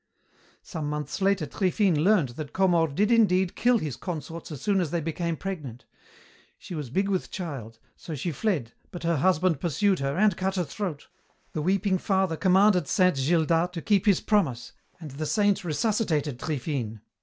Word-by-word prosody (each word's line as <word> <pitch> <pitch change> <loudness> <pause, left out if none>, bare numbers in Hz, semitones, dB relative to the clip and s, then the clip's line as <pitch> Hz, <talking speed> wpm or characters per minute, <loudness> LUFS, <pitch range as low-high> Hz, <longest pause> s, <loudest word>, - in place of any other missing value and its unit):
"Some 155 -4 -5
months 150 +4 -4
later 195 -4 +2
Triphine 185 -1 +1
learned 185 -8 +3
that 145 +4 -8
Comor 175 -4 +3
did 210 +6 +2
indeed 190 -6 +3
kill 245 +1 +3
his 150 - -4
consorts 165 -1 -6
as 145 - -6
soon 200 -3 +1
as 170 - -1
they 170 - -1
became 165 +1 -3
pregnant. 150 -11 -6 0.7
She - - -10
was 150 -6 -5
big 195 +10 0
with 190 -2 -1
child, 135 - -6 0.2
so 160 - -7
she 155 +5 -3
fled, 150 - -2 0.2
but 175 - -8
her 170 -1 +1
husband 175 0 +2
pursued 185 +5 +1
her 140 +3 -2
and 210 -2 +3
cut 190 +1 -2
her 180 - +1
throat. 170 -1 -5 0.5
The 155 - -2
weeping 190 +2 +1
father 190 -4 +1
commanded 190 +2 +4
Saint 185 -7 +3
Gildas 165 +4 +2
to 165 - -5
keep 205 -1 +2
his 200 -4 +4
promise, 145 - 0 0.3
and 155 -4 -8
the 155 +3 -4
Saint 205 0 +2
resuscitated 160 - 0
Triphine. 125 -7 -3
175 Hz, 175 wpm, -26 LUFS, 150-195 Hz, 0.7 s, commanded